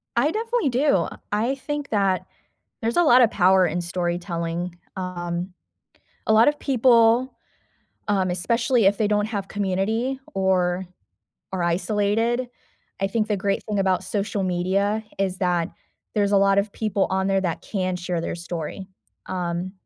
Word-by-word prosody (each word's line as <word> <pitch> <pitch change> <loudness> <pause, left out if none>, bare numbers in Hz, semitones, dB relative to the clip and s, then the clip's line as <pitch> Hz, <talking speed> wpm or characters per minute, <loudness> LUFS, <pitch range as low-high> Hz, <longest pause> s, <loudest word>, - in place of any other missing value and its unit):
I 280 +6 +3
definitely 455 - 0
do. 250 - +2 0.2
I 230 +6 +1
think 295 +1 -5
that, 195 -3 +1 0.5
there's 230 +1 -1
a - - +6
lot 255 -6 +6
of 225 - +3
power 185 0 +4
in 175 +1 -1
storytelling, 175 0 -3 0.2
um, 175 0 -4 0.8
a - - +3
lot 220 +1 +6
of 295 0 +2
people, 245 -2 +3 0.7
um, 190 -3 +1
especially 230 +5 +1
if 200 +1 +3
they 215 - +2
don't 210 0 +1
have 205 -3 -4
community 205 +7 -1 0.2
or 190 -1 +1 0.7
are 185 -2 -1
isolated 210 +7 0 0.5
I - - +3
think 215 +2 -1
the 210 - +1
great 195 +1 -1
thing 210 -2 -1
about 190 -1 +1
social 200 +1 -2
media 190 +4 0 0.2
is 190 -1 -1
that 175 -3 0 0.4
there's 205 -1 +1
a - - +5
lot 195 0 +4
of 200 +1 +1
people 210 -2 0
on 190 0 0
there 195 0 +2
that 175 -4 -2
can 185 -3 -2
share 180 -1 -3
their - - -3
story. 170 +2 -6 0.4
Um, 180 0 -3
195 Hz, 155 wpm, -23 LUFS, 180-225 Hz, 0.8 s, a